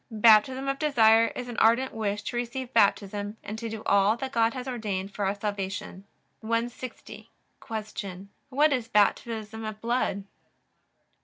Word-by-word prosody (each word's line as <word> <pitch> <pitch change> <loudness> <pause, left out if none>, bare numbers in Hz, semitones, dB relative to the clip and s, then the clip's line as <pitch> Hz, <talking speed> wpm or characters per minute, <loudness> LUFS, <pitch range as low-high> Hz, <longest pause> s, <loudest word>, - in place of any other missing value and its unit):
Baptism 230 +4 +4
of 275 0 -1
desire 230 -6 +5
is 250 - -5
an 240 - -7
ardent 235 +4 +3
wish 210 -2 -2
to 240 - -5
receive 245 +1 -4
Baptism, 205 -1 +1
and 215 +1 -6
to 230 0 -4
do 220 0 -6
all 200 +3 +3
that 265 +1 -5
God 230 0 +2
has 255 0 -5
ordained 205 -6 -3
for 205 - -2
our 195 +1 0
salvation. 200 -2 -5 0.3
160. 230 +3 -4 0.3
Q. 205 -4 -6 0.2
What 290 +3 +3
is 245 -3 -2
Baptism 220 +1 0
of 215 -1 -6
blood? 230 -4 -1
225 Hz, 150 wpm, -27 LUFS, 205-240 Hz, 0.3 s, desire